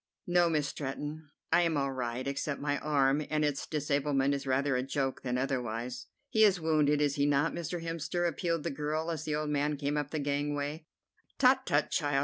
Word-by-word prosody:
"No, 175 -1 +3
Miss 150 -3 +1
Stretton, 145 +2 -5 0.2
I 175 - +6
am 165 -3 +1
all 140 -1 0
right, 125 -1 -3
except 140 +1 -2
my 145 0 -1
arm, 145 -1 +2
and 155 -1 +1
its 145 -2 -2
disablement 140 -2 +1
is 140 -1 -3
rather 135 +1 +2
a 125 - +1
joke 135 0 -2
than 125 -1 -1
otherwise." 125 -2 -3 0.2
"He 220 - +5
is 195 -4 +5
wounded, 150 -2 +2
is 145 -1 +1
he 140 0 +3
not, 145 +2 +2
Mr. 170 0 -4
Hemster?" 165 +1 -1
appealed 165 -2 -1
the - - -2
girl, 155 +3 -2
as 160 - -4
the 150 - -1
old 150 0 -2
man 145 0 0
came 145 +1 -1
up 145 -1 -1
the 155 - -3
gangway. 145 +2 -2 0.5
"Tut, - - +4
tut, - - +2
child! 145 -1 +1
145 Hz, 200 wpm, -31 LUFS, 140-155 Hz, 0.5 s, I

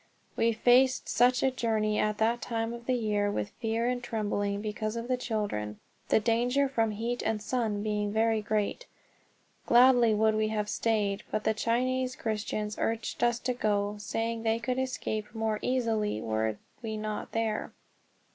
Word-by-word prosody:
We 230 - +3
faced 250 +3 +4
such 250 +1 +3
a 265 - +3
journey 220 -4 0
at 210 0 +1
that 230 +2 +1
time 225 -1 -2
of 235 0 -9
the 255 - +2
year 210 -3 0
with 105 - -2
fear 225 +1 0
and 250 0 -1
trembling 205 -3 -1
because 215 +1 -3
of 235 0 -4
the 255 - +2
children, 205 - -3 0.3
the - - +4
danger 240 +5 +2
from 230 -4 +1
heat 230 +3 -2
and 220 -1 0
sun 215 -2 -1
being 210 -1 -1
very 220 0 +2
great. 215 - -1 0.8
Gladly 240 -2 +6
would 220 +1 +3
we 215 0 +1
have 210 -1 -2
stayed, 210 -2 0
but 215 0 -2
the 220 - +2
Chinese 255 +3 0
Christians 210 -1 -3
urged 230 +1 -2
us 240 -1 +3
to 250 +1 0
go, 205 -3 0
saying 225 +2 -2
they 225 0 +1
could 250 +2 -2
escape 220 -4 -3
more 220 -1 -1
easily 225 - 0
were 110 0 -1 0.2
we 220 -2 -4
not 215 0 -4
there. 225 -1 -1
220 Hz, 165 wpm, -29 LUFS, 210-240 Hz, 0.8 s, Gladly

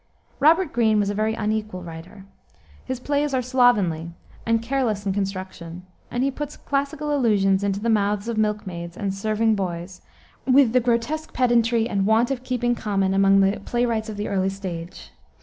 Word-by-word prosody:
Robert 325 +3 +4
Greene 220 -2 +3
was 205 0 +1
a - - -3
very 215 +2 0
unequal 215 -4 -3
writer. 175 +4 -10 0.6
His 260 -1 -4
plays 285 +1 0
are 255 - +1
slovenly 220 -11 +2 0.4
and 230 0 +3
careless 230 -4 -1
in 195 - 0
construction, 185 -3 -5 0.3
and 245 +1 -1
he 275 - +1
puts 295 +2 -6
classical 285 +1 -2
allusions 200 -6 +2
into 200 -1 0
the 225 - -3
mouths 210 -1 +1
of 235 - -2
milkmaids 195 -6 -2
and 195 -1 -2
serving 215 +3 +1
boys, 180 -2 -4 0.5
with 260 -3 +5
the 255 - +5
grotesque 245 +6 -1
pedantry 235 -2 +2
and 195 -4 0
want 225 +4 +3
of 260 -2 -2
keeping 245 -1 0
common 195 -4 0
among 195 0 +4
the 195 +2 +2
playwrights 235 -2 -1
of 210 - -6
the 205 - -3
early 190 -1 0
stage. 185 -2 -7
215 Hz, 170 wpm, -23 LUFS, 195-245 Hz, 0.6 s, with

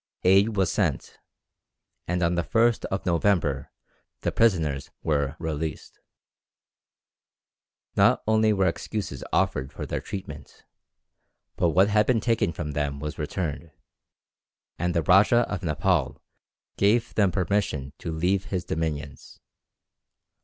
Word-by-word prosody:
Aid 100 +4 +4
was 95 -2 +2
sent, - - -2 0.9
and 90 +1 0
on 85 +1 +2
the 85 - +1
1st 115 +5 +2
of 95 - -3
November 85 -6 +1 0.5
the - - -1
prisoners 80 -11 +1
were 70 -2 0
released. 80 -1 -5 2.0
Not - - +4
only 110 0 +3
were 95 -2 +2
excuses 95 +4 -3
offered 65 +1 0
for - - -6
their - - -3
treatment, 75 -7 -9 0.9
but 85 - +2
what 95 +5 +4
had 105 0 +3
been 125 -3 +3
taken 110 -4 +1
from 75 -2 -5
them 70 -1 -2
was 75 +2 -6
returned, 80 +1 -4 1.1
and 90 +1 -1
the 85 - +2
Rajah 100 +7 +5
of 105 -4 -4
Nepaul 80 -2 0 0.6
gave 110 +4 +2
them 100 -4 +3
permission 90 -8 -1
to 85 - -5
leave 90 +4 0
his 90 -3 -3
dominions. 75 -3 -4
90 Hz, 125 wpm, -26 LUFS, 75-100 Hz, 2.0 s, Rajah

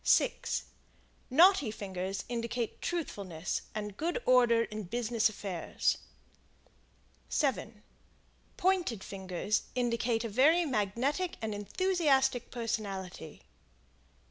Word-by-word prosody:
6 - - +2 0.7
Knotty 335 - +6
fingers 195 -2 -4
indicate 235 -1 -3
truthfulness 195 - -3
and 210 -2 -4
good 345 +9 -1
order 240 -2 +5
in 215 -2 -6
business 230 +2 +1
affairs. 195 -5 -1 1.3
7 260 -7 -1 0.7
Pointed 355 - +1
fingers 190 +2 -2
indicate 235 -2 +1
a - - -2
very 295 +11 +4
magnetic 265 - 0
and 220 -1 -3
enthusiastic 270 - +1
personality. 195 -8 -4
230 Hz, 90 wpm, -31 LUFS, 205-270 Hz, 1.3 s, Knotty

